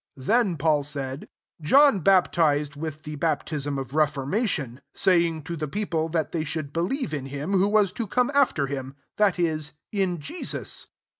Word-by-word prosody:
'' - - -59
4 130 - -12
Then 205 - +2
Paul 150 0 +2
said, 140 -1 -5 0.3
John 275 - +5
baptized 160 -6 +3
vnih 155 +1 -6
the 150 0 -6
bap, 155 -1 -1
sm 145 -3 -2
of 135 -1 -6
reformation; 145 - 0
saying 170 -4 +2
to 170 +2 -5
le 155 -1 -3
people, 165 -2 -1
that 160 -2 -1
they 165 -2 -1
should 150 -2 -4
elieve 180 - -1
in 135 -3 -3
him 145 +6 -5
who 195 0 +3
was 205 -3 +3
to 230 0 -3
jcome 250 +6 +1
fter 270 - +3
him, 135 -1 -5 0.2
that 205 -3 +3
is, 155 -3 -1 0.2
in 190 -4 +1
Jesus." 330 - -5
160 Hz, 175 wpm, -25 LUFS, 145-195 Hz, 0.3 s, John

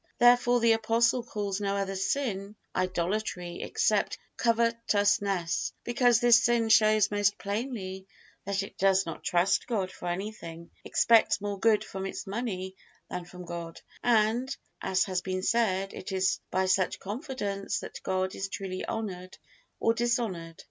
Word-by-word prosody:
Therefore 245 0 +5
the 230 0 +4
Apostle 225 +2 +2
calls 205 -4 -3
no 200 0 0
other 195 0 -2
sin 200 0 -2 0.2
idolatry 185 0 -2
except 450 +2 +1 0.2
covetousness, 205 -6 +1
because 240 -1 +3
this 240 0 +6
sin 235 -2 +2
shows 215 -1 +5
most 205 0 +2
plainly 200 -3 -4 0.4
that 195 0 -1
it - - -11
does 195 0 +4
not 165 - -7
trust 175 +3 +2
God 195 -6 -1
for 180 - -8
anything, 175 -3 -5
expects 230 -3 +4
more 205 -1 -4
good 220 0 +3
from 190 0 -5
its - - -6
money 195 -3 -4 0.4
than 180 - -4
from 180 0 -10
God; 170 -1 -6 0.2
and, 240 +3 +2 0.2
as 185 - +2
has 185 -2 -1
been 185 0 -3
said, 195 -4 +1
it 185 - -7
is 190 0 +1
by 190 0 +1
such 185 0 +1
confidence 205 - -3
that - - -8
God 185 0 -1
is 195 - -3
truly 190 -2 -4
honored 185 -4 -5 0.4
or 225 - +3
dishonored. 225 -9 -1
200 Hz, 145 wpm, -29 LUFS, 185-230 Hz, 0.4 s, this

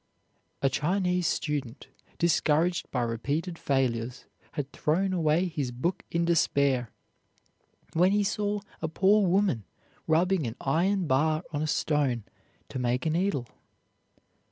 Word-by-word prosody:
A 135 - +4
Chinese 180 +4 +1
student, 140 -5 -3 0.3
discouraged 170 0 +2
by 125 -2 -1
repeated 145 +9 -2
failures, 125 -2 -1 0.3
had 145 -1 -4
thrown 185 +5 0
away 165 0 +2
his 150 -6 -3
book 150 +10 -2
in 170 0 0
despair, 140 -7 +2 1.0
when 180 +3 +4
he 205 0 +3
saw 205 0 -1 0.2
a 160 - -1
poor 195 +5 +3
woman 180 - +2 0.4
rubbing 165 -1 +2
an 115 - -5
iron 180 +7 +1
bar 155 +3 +2
on 145 - -1
a 155 - 0
stone 145 -6 +1 0.4
to - - -5
make 125 0 0
a 160 - +2
needle. 170 -6 0
155 Hz, 130 wpm, -28 LUFS, 135-180 Hz, 1.0 s, A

